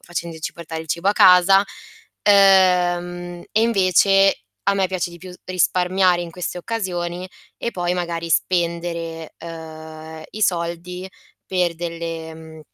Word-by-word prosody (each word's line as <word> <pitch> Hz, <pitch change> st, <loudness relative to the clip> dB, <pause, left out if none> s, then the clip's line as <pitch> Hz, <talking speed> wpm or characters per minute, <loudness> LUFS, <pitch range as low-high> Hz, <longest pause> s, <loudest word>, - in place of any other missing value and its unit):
facendoci 170 Hz, -2 st, -5 dB
portare 160 Hz, -1 st, -7 dB
il 160 Hz, -, -16 dB
cibo 170 Hz, +5 st, 0 dB
a 205 Hz, -, +4 dB
casa. 185 Hz, 0 st, +7 dB, 0.7 s
Uhm, 175 Hz, -3 st, +3 dB
e, 220 Hz, -, +3 dB
invece, 195 Hz, -, +4 dB, 0.2 s
a 200 Hz, 0 st, +2 dB
me 195 Hz, -1 st, +1 dB
piace 185 Hz, -1 st, -3 dB
di 170 Hz, -, -11 dB
più 180 Hz, +1 st, -10 dB
s 180 Hz, -, -15 dB
risparmiare 185 Hz, 0 st, +2 dB
in 170 Hz, -, -7 dB
queste 180 Hz, +1 st, -5 dB
occasioni, 180 Hz, -3 st, -3 dB, 0.3 s
e 235 Hz, -, -2 dB
poi 175 Hz, -3 st, -2 dB
magari, 170 Hz, -1 st, -3 dB
spendere, 170 Hz, -2 st, -1 dB
uhm, 160 Hz, -1 st, -9 dB
i 215 Hz, -, -8 dB
soldi 175 Hz, +1 st, -2 dB, 0.4 s
per 180 Hz, -2 st, 0 dB
delle 165 Hz, -1 st, -5 dB
mhmm, 160 Hz, -1 st, -12 dB
175 Hz, 135 wpm, -21 LUFS, 165-185 Hz, 0.7 s, casa